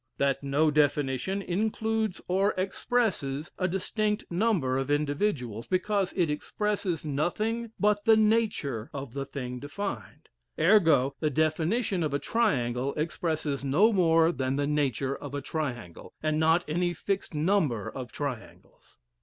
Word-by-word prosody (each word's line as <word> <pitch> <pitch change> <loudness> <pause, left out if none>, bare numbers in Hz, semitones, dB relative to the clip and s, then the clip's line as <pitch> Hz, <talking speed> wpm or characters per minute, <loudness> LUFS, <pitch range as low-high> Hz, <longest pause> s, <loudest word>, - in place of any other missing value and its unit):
That 135 -1 +1
no 145 +3 +2
definition 150 +5 +1
includes 220 +2 -1
or 195 +3 +2
expresses 185 - -1
a 185 - +2
distinct 210 +3 -1
number 170 - +1
of 135 +1 -3
individuals, 145 - -1
because 195 +1 0
it 175 -3 +2
expresses 180 +2 -2
nothing 215 +11 -1
but 205 0 +2
the 225 -1 +6
nature 210 - +1
of 135 -4 -6
the 140 0 -3
thing 125 -3 -5
defined; 145 - -6 0.3
ergo, 160 -7 +4
the 155 - +1
definition 165 - 0
of 150 -3 0
a - - +3
triangle 135 - 0
expresses 155 -2 -2
no 190 +12 +4
more 165 -3 +4
than 130 -2 -1
the 145 0 0
nature 140 -2 0
of 145 -1 -7
a - - -1
triangle, 120 - -5
and 155 0 +1
not 160 +2 +3
any 175 +3 0
fixed 195 -1 -3
number 150 - +1
of 125 -4 -7
triangles. 140 -6 -7
155 Hz, 135 wpm, -28 LUFS, 140-200 Hz, 0.3 s, the